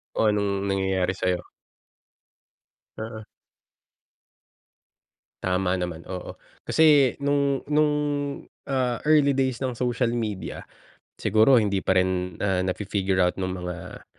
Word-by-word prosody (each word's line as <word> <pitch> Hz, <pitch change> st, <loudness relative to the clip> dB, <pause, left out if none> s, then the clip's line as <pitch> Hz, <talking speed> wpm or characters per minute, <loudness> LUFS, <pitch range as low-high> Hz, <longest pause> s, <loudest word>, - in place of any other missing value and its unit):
Kung 110 Hz, -, +3 dB
anong 100 Hz, -1 st, -1 dB
nangyayari 95 Hz, -1 st, 0 dB
sayo. 90 Hz, -1 st, -1 dB, 1.5 s
Oo. 110 Hz, 0 st, -6 dB, 2.2 s
Tama 90 Hz, 0 st, +1 dB
naman 90 Hz, -3 st, -4 dB
oo, 90 Hz, -1 st, -7 dB, 0.2 s
kasi 150 Hz, -5 st, +4 dB
nung 140 Hz, -1 st, 0 dB
nung, 150 Hz, 0 st, +3 dB, 0.8 s
ah, 125 Hz, -3 st, 0 dB
early 145 Hz, -3 st, +5 dB
days 130 Hz, -2 st, 0 dB
ng 130 Hz, -2 st, -1 dB
social 120 Hz, 0 st, 0 dB
media, 105 Hz, -5 st, -4 dB, 0.6 s
siguro 110 Hz, +6 st, +4 dB
hindi 100 Hz, -3 st, +1 dB
pa 95 Hz, -, +1 dB
rin, 90 Hz, -1 st, 0 dB
ah, 95 Hz, -2 st, +1 dB
na 95 Hz, -, 0 dB
fi-figure 95 Hz, -2 st, -1 dB
out 90 Hz, 0 st, +3 dB
nung 95 Hz, 0 st, -2 dB
mga 90 Hz, 0 st, -7 dB
100 Hz, 115 wpm, -25 LUFS, 95-130 Hz, 2.2 s, early